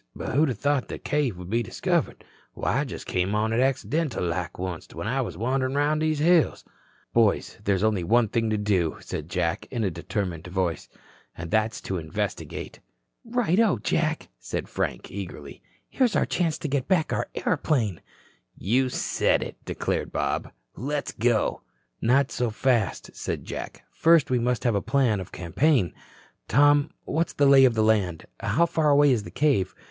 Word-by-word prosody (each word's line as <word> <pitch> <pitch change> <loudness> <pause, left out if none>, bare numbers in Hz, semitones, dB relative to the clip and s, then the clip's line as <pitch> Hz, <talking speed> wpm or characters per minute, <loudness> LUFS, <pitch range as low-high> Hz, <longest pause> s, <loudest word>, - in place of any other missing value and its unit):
But - - -4
who'da 140 -2 +2
thought 145 +3 0
that - - -7
cave 145 -10 0
would 90 +1 -8
be 115 +1 +2
discovered. 105 - -1 0.3
Why, - - 0
I - - 0
just - - -7
come 90 +3 0
on 110 +1 +1
it 115 - +1
accidental 135 - 0
like 85 +1 -3
onct 90 -3 -5
when - - -4
I 135 +4 0
was 90 -9 -5
wanderin' 130 +4 0
through 150 +2 +2
these 155 -1 +1
hills." 165 +2 +3 0.5
"Boys, 115 -3 +2
there's 100 -1 +1
only 105 -5 +2
one 115 +5 +3
thing 115 +2 0
to 110 - +1
do," 95 -6 0
said - - -6
Jack - - -1
in 115 - -2
a 95 - 0
determined 90 0 -4
voice, 90 -3 -2 0.5
"and 80 0 -6
that's 110 +1 +1
to 95 - -3
investigate." 80 -1 -5 0.4
"Righto, 230 -4 +2
Jack," 155 -1 -1
said - - -4
Frank - - -3
eagerly. 80 -8 -8 0.3
"Here's 250 -5 +1
our - - +3
chance 165 -3 0
to - - -4
get 135 -2 -1
back 170 -4 +2
our - - -2
airplane." 130 - 0 0.6
"You 130 +6 +1
said - - +1
it," - - -7
declared - - -2
Bob. - - -2 0.2
"Let's 145 +3 -3
go." 115 -2 +1 0.4
"Not 130 +4 +3
so 125 -1 -1
fast," 115 -2 0
said - - -4
Jack. - - -7
"First 165 -5 +4
we 125 - +3
must 125 -1 0
have 120 - +2
a 100 - +1
plan 125 -6 +2
of 95 - -7
campaign. 95 - +1 0.5
Tom, 145 +1 +4 0.2
what's 165 +3 -1
the 145 - +2
lay 135 -1 +8
of 120 -3 +3
the 110 - +2
land? 100 -7 +1
How 135 - +2
far 160 -2 +1
away 145 0 +5
is 120 -4 +2
the 105 - -9
cave? 125 -10 +1
120 Hz, 175 wpm, -26 LUFS, 100-145 Hz, 0.6 s, lay